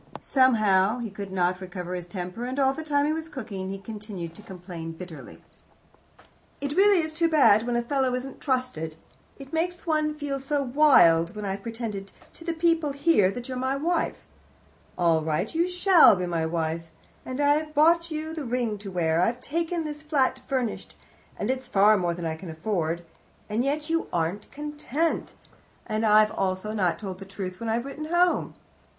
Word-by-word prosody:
Somehow 215 Hz, -5 st, +3 dB
he 235 Hz, -4 st, -5 dB
could 195 Hz, 0 st, -7 dB
not 180 Hz, 0 st, 0 dB
recover 180 Hz, -1 st, -6 dB
his 175 Hz, -1 st, -5 dB
temper, 185 Hz, +4 st, -5 dB
and 255 Hz, +2 st, -4 dB
all 270 Hz, -1 st, +3 dB
the 315 Hz, -, -6 dB
time 290 Hz, -2 st, +1 dB
he 305 Hz, -, +1 dB
was 320 Hz, 0 st, -5 dB
cooking 205 Hz, -9 st, -6 dB
he 195 Hz, -, -4 dB
continued 195 Hz, -4 st, -7 dB
to 190 Hz, -, -13 dB
complain 175 Hz, -4 st, -8 dB
bitterly. 165 Hz, -1 st, -10 dB, 1.2 s
"It 285 Hz, +1 st, -3 dB
really 390 Hz, -3 st, +5 dB
is 315 Hz, 0 st, -5 dB
too 330 Hz, +1 st, +2 dB
bad 245 Hz, -8 st, +5 dB
when 240 Hz, -, 0 dB
a 240 Hz, -, +1 dB
fellow 260 Hz, 0 st, 0 dB
isn't 260 Hz, +1 st, -6 dB
trusted. 250 Hz, -, -2 dB, 0.4 s
It 275 Hz, +1 st, -12 dB
makes 350 Hz, +2 st, -2 dB
one 305 Hz, -2 st, +1 dB
feel 290 Hz, -2 st, -3 dB
so 280 Hz, +1 st, -1 dB
wild, 245 Hz, -, +5 dB
when 210 Hz, -1 st, -5 dB
I've 195 Hz, 0 st, -3 dB
pretended 220 Hz, -3 st, -5 dB, 0.2 s
to -, -, -13 dB
the 335 Hz, 0 st, -2 dB
people 325 Hz, -3 st, +1 dB
here 280 Hz, -, +3 dB
that 240 Hz, +4 st, -6 dB
you're 255 Hz, -1 st, -4 dB
my 260 Hz, +1 st, 0 dB
wife 335 Hz, +5 st, -1 dB, 0.7 s
all 165 Hz, -3 st, +3 dB
right, 155 Hz, +6 st, -1 dB
you 335 Hz, +2 st, +2 dB
shall 360 Hz, -, +6 dB
be 180 Hz, -1 st, -2 dB
my 165 Hz, -2 st, -1 dB
wife 165 Hz, 0 st, -2 dB, 0.3 s
and 255 Hz, +1 st, -5 dB
I've 300 Hz, +1 st, +2 dB
bought 335 Hz, +3 st, +4 dB
you 315 Hz, 0 st, -4 dB
the 320 Hz, -2 st, -4 dB
ring 240 Hz, -4 st, -1 dB
to 200 Hz, -1 st, -7 dB
wear, 165 Hz, -3 st, +1 dB
and 180 Hz, -, +4 dB
I've 240 Hz, +1 st, -6 dB
taken 335 Hz, +4 st, -2 dB
this 300 Hz, -1 st, -6 dB
flat 295 Hz, -4 st, +1 dB
furnished, 255 Hz, -5 st, -2 dB, 0.4 s
and 210 Hz, -, 0 dB
it's 260 Hz, -1 st, -4 dB
far 210 Hz, -2 st, +5 dB
more 175 Hz, -3 st, 0 dB
than 175 Hz, -1 st, -5 dB
I 160 Hz, -1 st, -2 dB
can 170 Hz, +2 st, -9 dB
afford, 170 Hz, 0 st, -2 dB, 0.4 s
and 215 Hz, +3 st, 0 dB
yet 295 Hz, +2 st, -1 dB
you 330 Hz, 0 st, 0 dB
aren't 170 Hz, +4 st, -2 dB
content, 295 Hz, +2 st, -2 dB, 0.5 s
and 215 Hz, -1 st, -2 dB
I've 215 Hz, 0 st, +6 dB
also 190 Hz, +2 st, -2 dB
not 180 Hz, -6 st, +1 dB
told 190 Hz, -3 st, -6 dB
the 195 Hz, -, -8 dB
truth 190 Hz, -1 st, -6 dB
when 230 Hz, -, -3 dB
I've 235 Hz, +3 st, 0 dB
written 295 Hz, +2 st, -6 dB
home." 345 Hz, +2 st, +1 dB
235 Hz, 190 wpm, -26 LUFS, 185-295 Hz, 1.2 s, shall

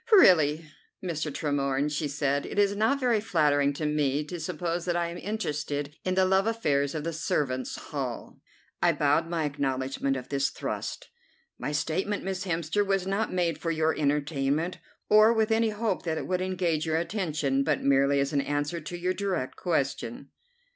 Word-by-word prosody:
"Really, 160 Hz, -, +6 dB, 0.4 s
Mr. 160 Hz, -4 st, -2 dB
Tremorne," 140 Hz, -1 st, 0 dB
she 150 Hz, 0 st, -1 dB
said, 140 Hz, 0 st, -1 dB
"it -, -, -7 dB
is 200 Hz, 0 st, +3 dB
not 225 Hz, +7 st, +2 dB
very 245 Hz, -4 st, +2 dB
flattering 150 Hz, -9 st, +2 dB
to 155 Hz, +2 st, -4 dB
me 150 Hz, -1 st, +1 dB
to 170 Hz, +4 st, -6 dB
suppose 170 Hz, +1 st, -3 dB
that 175 Hz, -1 st, 0 dB
I 170 Hz, -1 st, 0 dB
am 170 Hz, -, -7 dB
interested 150 Hz, -8 st, -3 dB
in 185 Hz, 0 st, 0 dB
the 190 Hz, 0 st, +4 dB
love 190 Hz, +2 st, +3 dB
affairs 145 Hz, -11 st, 0 dB
of 155 Hz, -, -3 dB
the 165 Hz, +1 st, -3 dB
servants' 140 Hz, -5 st, -1 dB
hall." 130 Hz, -6 st, -5 dB, 0.4 s
I -, -, +4 dB
bowed 150 Hz, +3 st, +2 dB
my 165 Hz, -2 st, 0 dB
acknowledgment 135 Hz, -1 st, -1 dB
of 125 Hz, -, -8 dB
this 140 Hz, -1 st, +1 dB
thrust. -, -, -5 dB, 0.5 s
"My -, -, -3 dB
statement, 170 Hz, +7 st, -1 dB
Miss 190 Hz, 0 st, -3 dB
Hemster, 170 Hz, +3 st, 0 dB
was 195 Hz, -2 st, 0 dB
not 195 Hz, +3 st, -1 dB
made 170 Hz, -4 st, 0 dB
for 165 Hz, -, -2 dB
your 160 Hz, -1 st, +1 dB
entertainment, 145 Hz, +2 st, 0 dB, 0.3 s
or 215 Hz, +2 st, +6 dB
with 220 Hz, -1 st, +1 dB
any 225 Hz, 0 st, +3 dB
hope 210 Hz, -2 st, -1 dB
that 160 Hz, -1 st, -1 dB
it -, -, -3 dB
would 185 Hz, 0 st, -1 dB
engage 175 Hz, -4 st, 0 dB
your 160 Hz, 0 st, +1 dB
attention, 155 Hz, -7 st, 0 dB
but -, -, 0 dB
merely 140 Hz, +1 st, +3 dB
as 140 Hz, +1 st, 0 dB
an 140 Hz, -, +3 dB
answer 145 Hz, +4 st, -2 dB
to 165 Hz, +3 st, -6 dB
your 180 Hz, +1 st, 0 dB
direct 185 Hz, -9 st, -2 dB
question." 140 Hz, -6 st, -2 dB
160 Hz, 180 wpm, -28 LUFS, 145-185 Hz, 0.5 s, Really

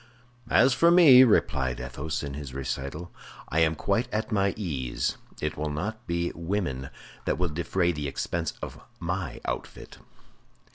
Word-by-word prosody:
"As 125 Hz, +3 st, +5 dB
for 170 Hz, +6 st, +5 dB
me," 155 Hz, -8 st, +9 dB
replied 65 Hz, -, +2 dB
Athos 60 Hz, +6 st, -4 dB
to 70 Hz, -, -4 dB
this 70 Hz, -2 st, -7 dB
recital, 70 Hz, +5 st, -4 dB, 0.4 s
"I 80 Hz, -, +1 dB
am 80 Hz, -1 st, +3 dB
quite 110 Hz, +9 st, 0 dB
at 110 Hz, +3 st, -2 dB
my 100 Hz, -2 st, +1 dB
ease; 70 Hz, -, -2 dB, 0.2 s
it -, -, -2 dB
will 75 Hz, 0 st, -2 dB
not 110 Hz, +10 st, -4 dB
be 85 Hz, 0 st, -1 dB
women 85 Hz, -7 st, -3 dB, 0.4 s
that -, -, 0 dB
will 90 Hz, 0 st, 0 dB
defray 85 Hz, +3 st, 0 dB
the 75 Hz, -3 st, -3 dB
expense 85 Hz, +4 st, -2 dB
of -, -, -7 dB, 0.2 s
my -, -, -3 dB
outfit." -, -, -6 dB
85 Hz, 150 wpm, -27 LUFS, 70-105 Hz, 0.4 s, me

